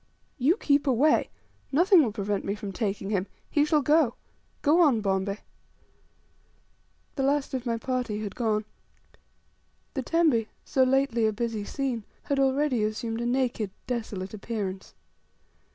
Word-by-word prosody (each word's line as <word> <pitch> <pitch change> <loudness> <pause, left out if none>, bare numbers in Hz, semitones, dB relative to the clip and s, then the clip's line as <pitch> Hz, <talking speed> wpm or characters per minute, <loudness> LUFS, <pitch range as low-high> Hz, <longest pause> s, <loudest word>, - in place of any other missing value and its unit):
"You 300 - +3
keep 285 -7 +2
away; 275 +4 +3 0.4
nothing 350 +5 +6
will 240 -7 +1
prevent 205 -1 -2
me 200 - -2
from 205 -1 -6
taking 200 -1 -2
him. 195 -1 0 0.2
He 290 - +3
shall 300 -1 +2
go." 295 -4 +3 0.5
"Go 315 +4 +5
on, 280 -9 +5
Bombay." 195 0 -1 1.8
The - - 0
last 275 +1 +1
of 255 -1 -3
my 230 -1 0
party 240 -3 -2
had 205 - -5
gone. 215 -3 0 1.3
The 270 - -2
tembe, 285 -7 +2 0.2
so 265 - +1
lately 260 -3 +3
a - - +1
busy 225 -1 -3
scene, 250 -1 -3 0.2
had 280 -1 -1
already 270 -3 +2
assumed 225 +2 -2
a 240 - -1
naked, 245 -4 0 0.2
desolate 220 -6 -4
appearance. 200 -3 -5
240 Hz, 140 wpm, -27 LUFS, 215-275 Hz, 1.8 s, nothing